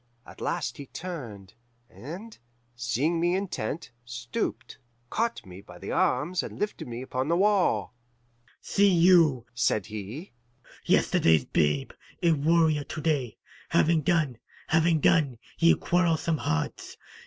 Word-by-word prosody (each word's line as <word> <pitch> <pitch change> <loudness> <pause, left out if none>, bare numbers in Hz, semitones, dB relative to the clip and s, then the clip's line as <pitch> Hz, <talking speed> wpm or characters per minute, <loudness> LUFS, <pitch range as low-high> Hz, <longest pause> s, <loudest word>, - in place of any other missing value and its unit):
At - - -14
last - - -2
he 140 - -9
turned, 120 - -8 0.3
and, 170 - -9 0.4
seeing 130 +8 0
me 175 +2 +2
intent, 175 - -4
stooped, 120 0 -5 0.3
caught 230 +1 -1
me 95 +1 -11
by 90 -3 -14
the - - -7
arms, 165 +8 +1
and - - -8
lifted 210 -8 -3
me 120 +1 -6
upon 130 +1 -3
the 170 +2 +2
wall. 200 -7 +2 0.7
'See 200 0 +3
you,' 165 -8 +5
said 120 -4 +1
he, 110 - -7 0.5
'yesterday's 80 -4 +3
babe 75 -3 0 0.3
a 170 - +5
warrior 160 0 +3
to 155 - -7
day. 140 -7 -1 0.3
Have 160 -1 +3
done, 150 -7 +1 0.3
have 160 0 +3
done, 140 -7 +3 0.2
ye 170 0 +6
quarrelsome 165 -3 +1
hearts. 75 0 -3
150 Hz, 130 wpm, -27 LUFS, 120-170 Hz, 0.7 s, ye